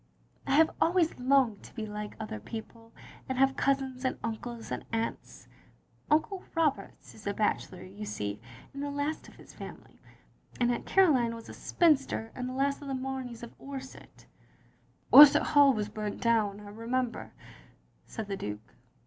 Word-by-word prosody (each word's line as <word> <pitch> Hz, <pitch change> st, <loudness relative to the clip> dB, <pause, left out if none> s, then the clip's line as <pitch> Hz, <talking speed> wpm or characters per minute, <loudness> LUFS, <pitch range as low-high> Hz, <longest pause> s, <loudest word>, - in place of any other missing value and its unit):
I 270 Hz, -, +2 dB
have 320 Hz, +1 st, +5 dB
always 335 Hz, -3 st, +2 dB
longed 255 Hz, -4 st, +3 dB
to -, -, -15 dB
be 220 Hz, -3 st, -4 dB
like 210 Hz, 0 st, -6 dB
other 215 Hz, -, -5 dB
people, 225 Hz, -, -9 dB, 0.4 s
and 260 Hz, -, -2 dB
have 270 Hz, 0 st, +3 dB
cousins 270 Hz, -2 st, 0 dB
and 260 Hz, -, -1 dB
uncles 230 Hz, +1 st, -5 dB
and -, -, -3 dB
aunts. 225 Hz, 0 st, -4 dB, 0.6 s
Uncle 340 Hz, +5 st, +1 dB
Roberts 300 Hz, -11 st, -1 dB
is 210 Hz, -, -11 dB
a 200 Hz, -, -1 dB
bachelor, 195 Hz, -3 st, -1 dB
you 200 Hz, +3 st, -9 dB
see, 105 Hz, -, -4 dB, 0.3 s
and 280 Hz, -, -6 dB
the 285 Hz, -, -2 dB
last 285 Hz, +2 st, -3 dB
of -, -, -15 dB
his -, -, -15 dB
family; -, -, -11 dB, 0.6 s
and 240 Hz, 0 st, +3 dB
Aunt 240 Hz, -, -3 dB
Caroline 265 Hz, -12 st, +4 dB
was 230 Hz, -, -11 dB
a -, -, -8 dB
spinster, 275 Hz, -9 st, +1 dB
and 250 Hz, 0 st, -4 dB
the -, -, -5 dB
last 280 Hz, +1 st, 0 dB
of 285 Hz, -, -8 dB
the 270 Hz, -, -2 dB
Mameys 260 Hz, -3 st, -5 dB
of 235 Hz, -, -9 dB
Orsett. 270 Hz, -1 st, -10 dB, 0.4 s
" -, -, -31 dB
"Orsett 295 Hz, +1 st, +10 dB
Hall 285 Hz, -2 st, +6 dB
was 210 Hz, -4 st, -1 dB
burnt 210 Hz, 0 st, -5 dB
down, 215 Hz, -3 st, +1 dB
I 205 Hz, -, -10 dB
remember," 235 Hz, +3 st, -3 dB, 0.7 s
said 220 Hz, -, -5 dB
the 200 Hz, -, -3 dB
Duke. 105 Hz, -, -7 dB
250 Hz, 170 wpm, -30 LUFS, 215-275 Hz, 0.7 s, Orsett